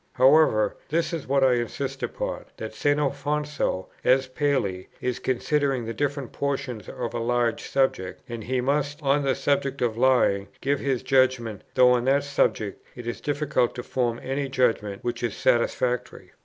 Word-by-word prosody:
However, 130 -5 +4
this 165 +2 0
is 165 -4 -4
what 135 0 +3
I 130 -1 +5
insist 130 +3 -3
upon; - - -4
that 110 0 -6
St. 145 +6 +1
Alfonso, 145 -7 -1 0.2
as 130 +1 +4
Paley, 130 -9 -1
is 125 -1 -2
considering 135 0 0
the 115 - -4
different 140 -1 -2
portions 130 -7 -3
of 120 -2 -4
a 120 - -2
large 120 -1 0
subject, 115 -9 0
and 115 -2 -6
he 130 +1 0
must, 145 +3 0
on 140 +1 +3
the 135 -2 +1
subject 140 -1 0
of 115 -2 -1
lying, 120 -6 +3
give 140 0 0
his 135 -3 -1
judgment, 130 -5 +2
though 125 -1 +6
on 125 -1 +2
that 140 +2 +3
subject 110 -7 0
it 120 - -8
is 120 - -4
difficult 145 -4 0
to 125 - -5
form 120 -2 -1
any 135 +1 -2
judgment 115 -6 0
which 120 0 -3
is 120 - -2
satisfactory. 120 +1 0
130 Hz, 170 wpm, -25 LUFS, 120-140 Hz, 0.2 s, though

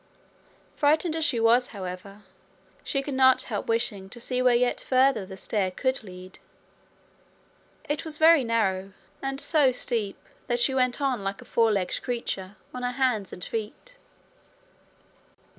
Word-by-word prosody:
Frightened 310 +3 +2
as 320 - -1
she 260 -7 +1
was, 235 +2 +4
however, 195 +1 -8 0.6
she 275 -1 -2
could 285 - -4
not 260 0 +5
help 210 -5 -4
wishing 225 -4 -1
to 240 - -7
see 250 +1 -2
where 250 -1 +4
yet 245 +1 +1
further 255 -6 +2
the 190 -1 -9
stair 195 -1 -1
could 260 +7 -1
lead. 185 -1 -11 1.5
It 295 0 -2
was 315 -2 -3
very 320 -2 +6
narrow, 195 -5 0 0.3
and 270 0 -3
so 290 -5 +3
steep 230 -5 -2 0.3
that 240 0 0
she 240 +3 +3
went 255 +1 +1
on 260 -7 0
like 195 0 -3
a - - -12
four 225 -1 +2
legged 195 -3 -1
creature 210 -5 -4 0.2
on 250 - -5
her 250 0 -2
hands 245 -7 0
and 180 - -5
feet. 230 - -6
240 Hz, 155 wpm, -26 LUFS, 200-265 Hz, 1.5 s, very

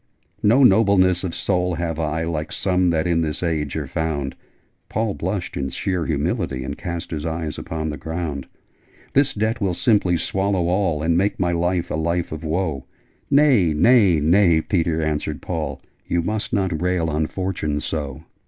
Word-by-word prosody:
'No 120 +7 +5
Nobleness 95 -5 +4
of 90 -3 -3
soul 90 -2 0
have 80 -1 -3
I, 80 0 -1
Like 80 -1 -3
some 90 -1 +1
that 80 -2 +1
in 85 -1 +2
this 75 +2 -2
Age 75 -4 -1
are - - -2
found!' 70 -4 -2 0.5
(Paul 110 -1 -1
blushed 70 - -3
in 70 -1 -2
sheer 90 +5 -2
humility, 80 - -1
And 70 +2 -4
cast 85 0 -5
his 75 -2 -3
eyes 80 -1 -3
upon 80 -1 -4
the 75 - -6
ground) 80 -5 -4 0.7
'This 140 +1 +3
debt 110 +2 -1
will 95 -3 0
simply 100 -6 +2
swallow 95 0 0
all, 90 -5 +1
And 85 +1 +2
make 100 +2 0
my 90 -2 +1
life 85 +1 0
a - - 0
life 85 +2 -1
of 80 +1 -6
woe!' 80 -4 -2 0.4
'Nay, 130 - +4
nay, 100 -3 +5
nay 85 +2 +4
Peter!' 80 -1 0
answered 75 -1 -2
Paul. - - -4 0.3
'You 85 -1 0
must 110 +6 -2
not 95 -8 0
rail 90 -2 +1
on 80 0 0
Fortune 90 -6 -2
so! 75 -3 -4
85 Hz, 170 wpm, -22 LUFS, 80-95 Hz, 0.7 s, No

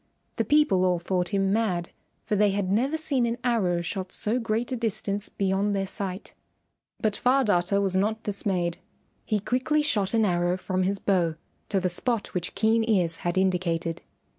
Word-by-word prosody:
The - - +2
people 295 -12 +3
all 180 -1 +3
thought 180 +1 -1
him 195 -1 +1
mad, 185 -6 0 0.3
for 210 - 0
they 210 0 +4
had 195 -1 -1
never 265 +9 +1
seen 275 -6 0
an 230 +1 -2
arrow 195 -8 +1
shot 185 +2 -4
so 225 +4 -1
great 230 +2 -1
a - - 0
distance 215 -3 -2
beyond 200 +1 0
their 195 0 0
sight. 190 0 -5 0.7
But 215 -2 0
Far 265 +4 +3
Darter 200 -2 +2
was 195 -2 0
not 215 +3 0
dismayed. 185 -4 -1 0.5
He 215 - +1
quickly 255 +8 +1
shot 210 -7 0
an 220 -1 +3
arrow 175 -1 +1
from 185 0 -2
his 195 +2 +1
bow 175 -5 +1 0.3
to 195 - +2
the 185 - 0
spot 220 +5 -2
which 175 -2 -3
Keen 225 +1 +3
Ears 175 -6 +2
had 175 +1 -2
indicated. 175 -3 0
200 Hz, 180 wpm, -26 LUFS, 180-225 Hz, 0.7 s, they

